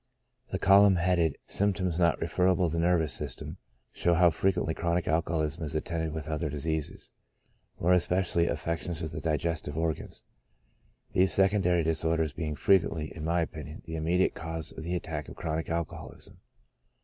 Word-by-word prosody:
The - - -2
column 100 0 +6
headed 85 -3 +1
symptoms 95 -4 0
not 85 -2 +3
referable 90 +1 +2
to - - -3
the 85 - +1
nervous 85 -6 +2
system^ 70 -4 -6 0.4
shows 85 -1 +1
how 85 0 +6
frequently 90 0 0
chronic 85 +1 -1
alcoholism 80 0 0
is 80 0 -4
attended 80 +1 -2
with 80 -1 -5
other 75 0 -2
diseases, 75 +1 -3 0.7
more 90 +2 +3
especially 90 -1 +2
affections 85 0 -3
of 80 - -4
the - - -5
diges 80 0 0
tive 75 +1 -6
organs; 80 -2 -3 0.9
these 95 -1 +4
secondary 95 -3 +3
disorders 80 -1 0
being 75 -3 -3
frequently, 80 -1 +1
in 80 - -7
my 85 +2 +1
opinion, 75 -1 -6
the 80 -1 -6
immediate 85 +4 +1
cause 80 -1 -4
of 80 - -8
the 85 +2 -2
attack 80 -4 -4
of - - -10
chronic 80 0 -3
alcoholism. 85 0 -5
85 Hz, 160 wpm, -29 LUFS, 80-90 Hz, 0.9 s, column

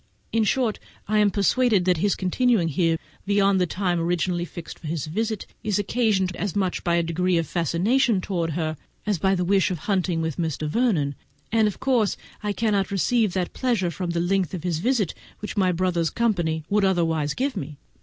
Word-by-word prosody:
In 225 -1 +2
short, 240 -1 +1 0.3
I 215 +1 +2
am 210 -1 +5
persuaded 205 0 +2
that 180 -2 +3
his 200 +4 +1
continuing 195 -1 +2
here 165 +2 +1 0.3
beyond 200 -1 +3
the 180 - +2
time 180 -1 -1
originally 175 +1 0
fixed 170 -1 -9
for 165 - -8
his 155 -2 -3
return 220 +6 -2 0.2
is 210 -3 0
occasioned 205 -3 +1
as 205 -2 -3
much 190 -3 -1
by 170 -1 +2
a 170 - +2
degree 175 +2 +1
of 165 - +1
fascination 185 - +1
towards 170 -4 -2
her, 155 -1 -2 0.3
as 205 -5 0
by 190 +3 +2
the 180 -1 -1
wish 195 +1 +3
of 180 - -2
hunting 180 -1 0
with 160 -3 -2
Mr. 160 -2 -2
Vernon, 160 - +1 0.4
and 220 -1 +4
of 210 - -4
course 245 -6 +1 0.2
I 210 - -1
cannot 205 -2 0
receive 210 +1 +1
that 185 -2 -2
pleasure 230 -9 0
from 180 -1 -4
the 170 0 -1
length 185 -1 0
of 170 - -6
his 170 -3 -1
visit 230 -3 +1 0.2
which 210 - -6
my 185 -3 +3
brother's 175 -2 0
company 175 -9 0
would 205 0 +2
otherwise 165 -6 +1
give 270 0 -1
me. 150 -6 -6
185 Hz, 195 wpm, -24 LUFS, 170-210 Hz, 0.4 s, am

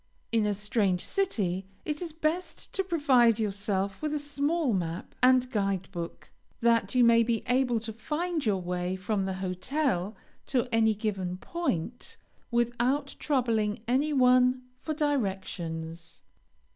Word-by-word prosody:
In 225 -2 +2
a 205 - 0
strange 205 -3 0
city 195 - -1 0.2
it 300 +1 -2
is 340 -2 -4
best 320 +3 -3
to 385 - +1
provide 270 - +4
yourself 200 -2 -1
with 305 -1 -1
a - - +1
small 290 0 0
map 170 -2 -3
and 255 0 +5
guide 195 -4 -1
book, 170 -1 -7 0.3
that 230 -2 +2
you 250 - +6
may 230 0 +6
be 230 -1 0
able 250 -1 +2
to 220 0 -6
find 310 +8 -2
your 205 -4 +1
way 180 0 -2
from 195 +1 -1
the 190 -1 -2
hotel 195 - -1 0.3
to 255 -2 +1
any 220 -1 +4
given 195 -4 -2
point, 245 - -3 0.3
without 240 +3 0
troubling 225 -7 0
any 270 +5 +2
one 255 -1 +4 0.2
for 310 - -3
directions. 175 - -3
230 Hz, 140 wpm, -29 LUFS, 195-275 Hz, 0.3 s, you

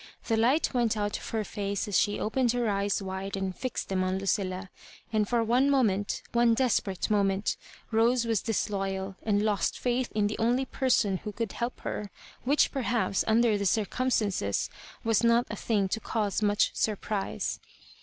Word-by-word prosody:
The 225 - +2
light 250 +9 +2
went 235 -3 +1
out 205 0 -1
of - - -8
her 220 -1 -1
face 200 0 -3
as 205 - -2
she 205 0 +2
opened 240 +2 +1
her 245 -1 0
eyes 200 -1 0
wide 190 +1 -4
and 190 -1 -3
fixed 255 -2 -4
them 185 -1 +1
on 185 0 0
Lucilla; 190 -1 -2 0.4
and 215 -2 +1
for 235 -1 +2
one 250 +5 +3
moment, 210 -8 +1
one 235 -1 +4
desperate 215 -6 0
moment, 200 -1 +1 0.4
Rose 235 +2 +3
was 225 -4 +1
disloyal, 195 -3 -2
and 205 -1 +1
lost 205 -5 0
faith 245 0 -1
in 210 -1 +2
the 205 - -2
only 245 +4 +2
person 245 -8 +1
who 210 - -6
could 225 -1 -3
help 240 +1 -4
her; 205 - -4 0.4
which, 285 +4 +3
perhaps, 245 -7 0
under 225 -1 +3
the 200 - +1
circumstances, 210 - 0 0.3
was 225 0 +2
not 235 +1 +4
a - - -3
thing 205 -2 0
to 225 - -1
cause 215 -2 -1
much 205 -1 +2
surprise. 210 -1 -2
215 Hz, 175 wpm, -28 LUFS, 200-235 Hz, 0.4 s, one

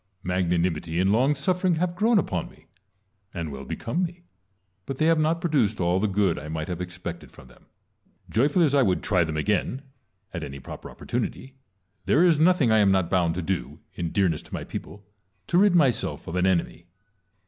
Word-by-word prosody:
Mag 90 -1 0
nanimity 85 -1 0
and 95 +2 +3
long 130 +7 +3
suffering 180 +5 +1
have 175 +2 -1
grown 220 +4 +3
upon 90 - -1
me, - - -21 0.7
and 85 -3 -4
well 70 -1 -7
become 130 - -3
me; 175 0 -4 0.6
but 135 - -4
they 155 - +1
have 165 -1 +4
not 160 +2 +1
produced 135 - +1
all 90 +1 +2
the 110 - +1
good 100 -3 +1
I 75 - -8
might 80 +2 -4
have 90 0 -4
expected 85 -1 -7
from 65 - -16
them. 65 - -21 0.6
Joyfully 145 - +2
as 145 - 0
I. 140 - +5
would 95 -7 +1
try 90 -4 +2
them 80 -1 -3
again, 105 - -1 0.5
at 85 -3 -4
any 70 -1 -7
proper - - -9
opportunity, 130 - -4 0.5
there 165 +5 +4
is 165 -4 +4
nothing 160 -7 +4
I 110 - +5
am 100 -2 +4
not 95 -3 +1
bound 85 -3 +2
to 90 - -3
do, 95 +2 -3
in 85 -1 -3
dearness 90 -6 +1
to - - -16
my - - -4
people, 100 -1 -8 0.4
to 175 - +2
rid 200 -2 +4
myself 135 - +1
of 85 - -5
an 90 +1 +2
enemy. 85 -1 -1
100 Hz, 200 wpm, -25 LUFS, -, 0.7 s, I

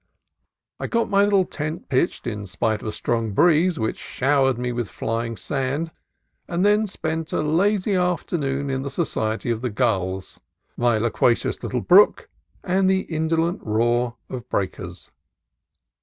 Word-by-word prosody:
I - - -3
got 230 -1 0
my 200 0 +5
little 200 -2 +3
tent 155 -1 -5
pitched 130 +6 0
in 105 -4 -4
spite 105 +5 -1
of - - -6
a - - -1
strong 115 -1 -2
breeze 170 - +4
which 110 -3 -2
showered 135 -1 +1
me 125 0 -2
with 120 -3 -3
flying 115 0 -3
sand; 140 - -2 0.6
and 175 +2 0
then 210 +1 +3
spent 160 -3 -4
a - - +1
lazy 190 +6 +2
after 180 -1 0
noon 140 -2 -1
in 135 0 -1
the 140 - -4
society 120 -7 -2
of 115 -1 -2
the 125 - -1
gulls, 95 -5 -1 0.4
my 120 -2 +2
loquacious 120 +1 +1
little 125 -2 -2
brook, 190 - +5 0.3
and 190 +1 +2
the 190 0 +3
indolent 165 +2 -1
roar 120 +2 +1
of 125 -3 -7
breakers. 95 -2 -4
135 Hz, 155 wpm, -23 LUFS, 115-175 Hz, 0.6 s, my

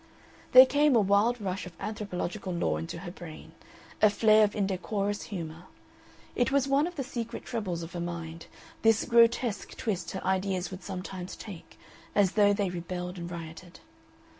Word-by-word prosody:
There 255 +1 +12
came 285 0 +3
a - - +6
wild 210 +4 +3
rush 190 -2 -3
of 180 - -11
anthropological 205 -2 -4
lore 80 - 0
into 80 - -5
her 175 - -5
brain, 175 -4 -10 0.5
a 215 - +7
flare 215 +1 +5
of 205 - +1
indecorous 200 +1 -1
humor. 170 -3 -6 0.7
It 245 +1 +1
was 275 -1 +2
one 280 +3 +3
of 355 - -8
the 275 - -2
secret 235 -3 -5
troubles 185 -8 -3
of 165 - -9
her 175 - -4
mind, 170 -1 -6 0.3
this 225 -1 +4
grotesque 235 -3 +2
twist 190 -6 -2
her 190 - -5
ideas 190 -1 0
would 185 0 -7
sometimes 185 -1 -6
take, 195 -6 -10 0.4
as 200 -3 +4
though 205 -1 +4
they 200 -2 0
rebelled 180 +1 -5
and 170 0 -5
rioted. 170 +1 -9
195 Hz, 165 wpm, -29 LUFS, 175-220 Hz, 0.7 s, There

